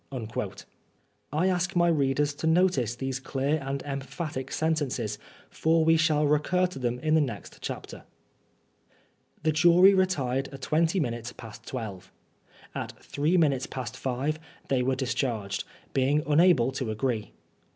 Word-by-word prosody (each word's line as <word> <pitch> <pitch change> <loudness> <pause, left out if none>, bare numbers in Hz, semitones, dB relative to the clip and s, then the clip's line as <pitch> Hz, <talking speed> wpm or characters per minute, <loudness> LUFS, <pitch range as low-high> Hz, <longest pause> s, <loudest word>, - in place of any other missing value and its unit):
I 155 +5 +1
ask 180 0 0
my 175 0 +4
readers 145 -2 +2
to 155 +3 -3
notice 160 - +2
these 135 +1 -3
clear 135 +3 -1
and 135 0 -3
emphatic 135 0 -5
sentences, 135 -9 -1 0.3
for 160 0 +2
we 165 0 +5
shall 155 -2 +3
recur 150 +5 +2
to 180 -7 -5
them 120 -1 -1
in 155 +2 +1
the 160 - +5
next 115 -9 -5
chapter. - - -6 1.4
The 155 - +3
jury 175 +5 +6
retired 140 -9 +1
at 135 -1 -11
twenty 165 +4 +2
minutes 120 -5 -3
past 110 -2 -11
twelve. 100 -7 -6 0.6
At - - -4
three 155 +6 +1
minutes 140 -6 +2
past 125 -2 -5
five 135 +5 -2 0.3
they 130 -2 +2
were 130 +1 +1
discharged, 120 -6 -2 0.3
being^ 140 +3 +2
unable 150 -5 +4
to 130 -3 -3
agree. 110 0 -2
140 Hz, 140 wpm, -27 LUFS, 125-160 Hz, 1.4 s, jury